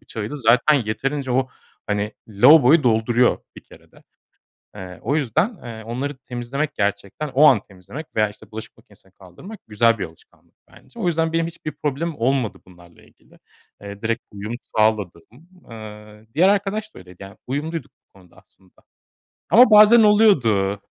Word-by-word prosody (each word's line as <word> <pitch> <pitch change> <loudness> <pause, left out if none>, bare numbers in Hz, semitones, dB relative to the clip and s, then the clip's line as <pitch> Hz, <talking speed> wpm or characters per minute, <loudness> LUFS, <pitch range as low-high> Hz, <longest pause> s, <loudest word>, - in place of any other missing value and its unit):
bıçağıydı 110 +6 -7
zaten 125 +3 +3
yeterince 135 +4 -3
o, 130 +1 0 0.4
hani, 105 +1 -2 0.2
lavaboyu 145 +8 +5
dolduruyor 120 +1 +2 0.2
bir - - -12
kerede. - - -20 0.7
Eee, 90 -2 -9
o 145 - -1
yüzden, 155 - -1
eee, 115 -2 -8
onları 130 +5 -5
temizlemek, 130 +4 -5
gerçekten 100 +8 -3
o 135 +3 +3
an 130 -9 +6
temizlemek 105 - -11
veya 105 -1 +2
işte 105 - -17
bulaşık 110 0 -10
makinesine 105 -5 -22
kaldırmak 100 - -13
güzel 115 +2 +2
bir 95 - -3
alışkanlık 80 -2 -17 0.2
bence. 130 - -18
O - - -2
yüzden 165 -1 0
benim 165 0 0
hiçbir 165 -2 -8
problemim 150 +3 -4
olmadı 125 -2 -1
bunlarla 85 -2 -19
ilgili. - - -24 0.4
Eee, 100 +1 -10
direkt 115 +1 -1
uyum 105 +3 -6 0.2
sağladım. 105 -6 0 0.5
Eee, 105 -1 -12
diğer 175 +6 +4
arkadaş 205 +2 -1
da - - -12
öyleydi. 90 +1 -15
Yani, 95 +1 -12
uyumluyduk 155 +5 -5 0.2
bu - - -56
konuda 90 -2 -22
aslında 95 -1 -23 0.8
ama 240 +1 +6
bazen 215 +2 +7
oluyordu. 120 - +3
120 Hz, 150 wpm, -21 LUFS, 105-155 Hz, 0.8 s, bazen